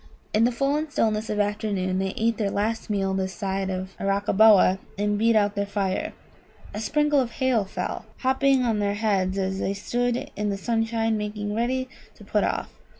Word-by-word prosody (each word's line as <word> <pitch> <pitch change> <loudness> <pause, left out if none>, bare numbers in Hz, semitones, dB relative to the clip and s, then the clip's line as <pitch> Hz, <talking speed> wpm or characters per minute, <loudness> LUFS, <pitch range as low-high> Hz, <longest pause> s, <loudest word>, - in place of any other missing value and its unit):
In 220 +2 +4
the 245 - +2
full 275 +4 +1
and 305 0 -3
stillness 215 -4 0
of 210 - -1
afternoon 205 -3 0
they 190 0 -2
ate 225 0 +1
their 205 -3 0
last 220 +3 -2
meal 195 -2 0
this 190 0 -2
side 195 -2 -2
of 185 0 -4
Arakkaboa, 195 -1 +4 0.2
and 205 +1 +1
beat 225 +2 +3
out 205 -1 +3
their 200 -1 -2
fire. 195 -2 -1 0.6
A 210 - -4
sprinkle 295 +5 +2
of 245 -3 -1
hail 255 -6 +1
fell, 195 - -4 0.2
hopping 265 0 +3
on 225 -3 +1
their 205 0 0
heads 195 -3 0
as 190 0 -1
they 195 - -1
stood 245 +4 -1
in 210 0 -1
the 200 - -2
sunshine 225 +1 0
making 210 0 -3
ready 255 +4 0 0.3
to - - -15
put - - 0
off. - - -2
210 Hz, 190 wpm, -25 LUFS, 195-230 Hz, 0.6 s, In